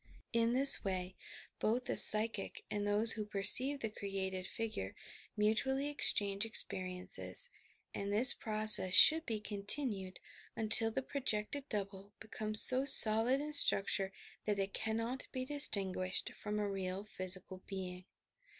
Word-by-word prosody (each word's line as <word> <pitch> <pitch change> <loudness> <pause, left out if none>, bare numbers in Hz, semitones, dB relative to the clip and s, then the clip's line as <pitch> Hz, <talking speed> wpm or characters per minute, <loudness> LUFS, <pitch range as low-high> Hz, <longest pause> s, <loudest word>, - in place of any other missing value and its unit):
In 230 0 -3
this 270 +2 +4
way 185 -1 -7 0.4
both 235 +4 -5
the - - -6
psychic 215 -1 +2
and 205 0 -7
those 210 +2 -1
who 215 - -7
perceive 210 +7 0
the 220 - -6
created 190 -2 -9
figure 215 - -9 0.4
mutually 265 +7 -4
ex 290 - +4
change 200 -1 -4
experiences; 185 - +1 0.4
and 200 0 -9
this 240 +6 +5
process 215 -4 +1
should 320 +1 +6
be 220 -2 -7
continued 205 -1 -4 0.4
until 225 0 -1
the 265 +4 -8
projected 270 0 -7
double 200 -1 -10
becomes 215 -1 -1
so 255 +1 +4
solid 240 0 +8
in 300 +1 -9
structure 195 -7 +2 0.3
that 210 -1 -5
it 195 0 -7
cannot 230 +3 -7
be 255 0 -9
distinguished 195 -10 -3
from 210 0 -10
a 210 -1 -6
real 190 0 -9
physical 185 -2 -4
being. 185 -2 -11
210 Hz, 135 wpm, -30 LUFS, 195-235 Hz, 0.4 s, solid